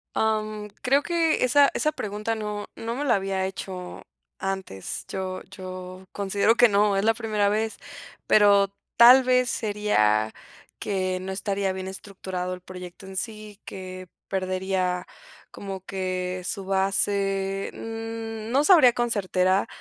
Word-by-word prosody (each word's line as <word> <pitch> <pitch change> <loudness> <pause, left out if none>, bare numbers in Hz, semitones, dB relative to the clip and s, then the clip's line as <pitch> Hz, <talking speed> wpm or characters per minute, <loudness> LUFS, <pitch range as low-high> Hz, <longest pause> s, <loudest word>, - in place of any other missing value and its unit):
Am, 215 -1 0
creo 275 +2 +3
que 335 -4 +1
esa 280 +3 +5
esa 305 - 0
pregunta 215 +2 -3
no 210 -1 -4
no 230 +1 -4
me 290 +2 -2
la 240 - +4
había 195 -1 -1
hecho 185 -1 -6 0.4
antes. 190 - -4
Yo 185 -1 -4
yo 185 -1 -8
considero 200 +3 +2
que 245 - +7
no, 205 -1 +3
es 195 - +1
la 225 - +5
primera 215 -3 0
vez, 215 +2 0 0.5
pero 200 -1 +5 0.2
tal 250 +3 +9
vez, 250 -1 +3
sería 110 - +1 0.5
que 185 -2 -1
no 190 +1 -5
estaría 195 0 -1
bien 190 0 -5
estructurado 190 -2 -5
el 180 - -7
proyecto 180 0 -10
en 190 0 -9
sí, 215 0 -6
que 185 -1 -8 0.2
perdería 185 -1 -1 0.4
como 195 -1 -7
que 185 -1 -3
su 195 -2 -4
base, 195 0 0
mm, 225 0 -6
no 275 +3 +3
sabría 310 -10 +7
con 240 -1 0
certera 185 -1 +1
200 Hz, 140 wpm, -25 LUFS, 185-220 Hz, 0.5 s, tal